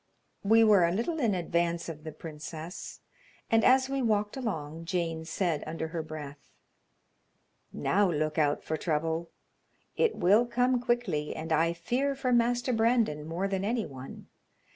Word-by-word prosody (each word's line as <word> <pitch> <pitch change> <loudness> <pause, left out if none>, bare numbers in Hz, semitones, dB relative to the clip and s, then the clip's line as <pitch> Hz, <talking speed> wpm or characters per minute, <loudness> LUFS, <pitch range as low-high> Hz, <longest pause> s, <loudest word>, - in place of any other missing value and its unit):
We 225 +3 +5
were 210 -5 +6
a - - 0
little 240 - -1
in 225 -8 +2
advance 170 -1 -1
of 155 -2 -7
the 160 - -6
princess, 155 +3 -8 0.5
and, 225 0 +4
as 260 +1 +5
we 275 0 -1
walked 210 -3 +1
along, 165 - -4
Jane 165 -2 -2
said 165 -2 -1
under 160 0 -4
her 165 0 -3
breath: 150 -2 -9 1.2
"Now 195 - +2
look 155 -1 -1
out 145 -1 +1
for 155 - -2
trouble; 165 +1 -1 0.7
it 465 -2 +2
will 205 +7 +4
come 250 +1 +1
quickly, 225 -12 -1
and 160 +1 -6
I 165 +2 +2
fear 250 +11 -1
for 260 -2 0
Master 245 +1 +2
Brandon 225 -10 +1
more 175 +4 -2
than 195 -1 -2
any 225 +2 0
one. 135 -1 -10
175 Hz, 155 wpm, -29 LUFS, 160-235 Hz, 1.2 s, were